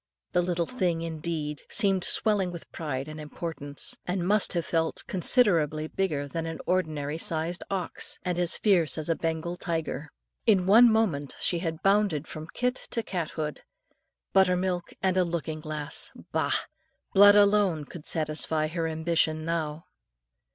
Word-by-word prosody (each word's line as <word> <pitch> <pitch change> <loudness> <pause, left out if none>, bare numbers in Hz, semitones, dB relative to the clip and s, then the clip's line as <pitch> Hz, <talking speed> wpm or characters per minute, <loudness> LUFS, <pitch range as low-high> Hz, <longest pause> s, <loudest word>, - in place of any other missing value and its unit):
The 180 - +2
little 175 -1 0
thing, 180 -8 -1
indeed, 155 -2 -4
seemed 195 -3 +1
swelling 200 -3 +2
with 170 -1 -9
pride 140 -4 -4
and 155 0 -7
importance, 150 -2 -2
and 180 -1 -1
must 210 +1 +4
have 170 -2 -1
felt 165 -1 0
considerably 170 - +3
bigger 155 -6 -2
than 165 +3 -4
an 165 - -5
ordinary 155 -4 -1
sized 165 +2 -2
ox, 190 -3 -3
and 180 -1 -1
as 175 -1 +2
fierce 175 - +3
as 155 +1 -3
a 165 - +2
Bengal 165 +2 -3
tiger. 160 -3 -3 0.4
In 195 -5 +4
one 230 +5 +7
moment 175 -11 0
she 175 - 0
had 165 -2 -4
bounded 195 -6 +2
from 155 0 -8
kit 250 +1 -1
to 230 - -2
cat 175 -6 -3
hood. 150 -1 -3 0.7
Buttermilk 180 -2 +2
and 190 -1 +2
a 185 - +5
looking 165 -2 -3
glass! 155 -1 -3 0.2
Bah! - - +1 0.6
Blood 205 +1 +8
alone 200 -6 +4
could 155 +1 -10
satisfy 155 0 0
her 165 0 -2
ambition 160 -1 0
now. 160 -2 -3
170 Hz, 150 wpm, -27 LUFS, 155-185 Hz, 0.7 s, Blood